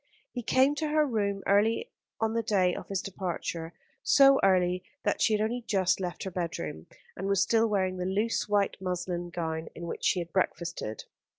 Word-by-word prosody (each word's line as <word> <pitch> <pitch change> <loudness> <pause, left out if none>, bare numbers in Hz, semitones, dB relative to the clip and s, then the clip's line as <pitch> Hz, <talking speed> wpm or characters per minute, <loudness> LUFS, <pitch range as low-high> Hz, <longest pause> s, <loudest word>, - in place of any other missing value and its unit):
He 245 - -4
came 260 +4 +3
to 310 - -1
her 305 0 +3
room 200 -6 -1
early 225 - +2 0.3
on 225 0 0
the 230 - +1
day 190 -5 +2
of - - -7
his 195 -2 -2
departure, 175 -3 -4 0.3
so 275 -1 +6
early 180 -1 +3 0.2
that - - 0
she 220 - +4
had 210 - +2
only 240 +3 -1
just 190 -6 +1
left 180 -2 -4
her 190 - -4
bedroom, 85 - -4 0.3
and 190 - -4
was 195 -1 +3
still 225 +2 +3
wearing 190 -3 0
the 180 - -3
loose 210 +3 0
white 205 -1 +1
muslin 180 -1 -3
gown 160 -2 -3
in 170 - -7
which 170 - -6
she - - +3
had 170 -1 -4
breakfasted. 170 - -2
195 Hz, 190 wpm, -29 LUFS, 175-220 Hz, 0.3 s, so